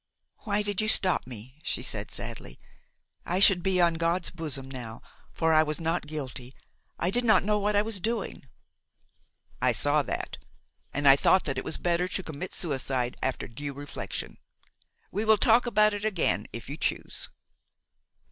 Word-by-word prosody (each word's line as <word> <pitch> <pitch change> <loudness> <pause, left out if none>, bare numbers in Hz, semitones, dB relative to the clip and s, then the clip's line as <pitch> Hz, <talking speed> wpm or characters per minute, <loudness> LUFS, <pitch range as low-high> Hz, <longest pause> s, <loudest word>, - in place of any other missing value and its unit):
"Why 210 -1 +1
did 205 -1 0
you 215 - 0
stop 185 -8 +3
me?" 125 +3 -11
she - - -2
said - - -3
sadly; 60 - -8 0.7
"I 180 +2 -1
should 195 -2 +6
be 185 +1 +1
on 170 -1 +4
God's 170 +2 +1
bosom 145 -6 -4
now, 120 -4 -7 0.3
for 160 -1 +1
I 155 - +7
was 155 0 -1
not 165 -1 -1
guilty, 130 -4 -6 0.4
I 175 - 0
did 245 +4 +2
not 225 -2 +5
know 210 +1 +1
what 205 +1 0
I 205 - +4
was 215 -2 -2
doing." 215 -8 -3 1.1
"I - - +3
saw - - +3
that, - - -4 0.5
and 145 +1 0
I 135 - +10
thought 185 +6 +4
that 135 - -1
it - - -5
was - - -2
better 175 +1 +1
to 190 - -2
commit 160 +3 -6
suicide 130 -6 -1
after 130 - -2
due 140 +4 -6
reflection. 145 +1 -6 0.7
We 205 - -1
will 220 -1 +5
talk 235 +4 +4
about 215 -2 +4
it 205 0 -4
again 205 -6 +1
if 115 -1 -6
you 145 +3 -6
choose." - - -2
170 Hz, 175 wpm, -28 LUFS, 140-205 Hz, 1.1 s, I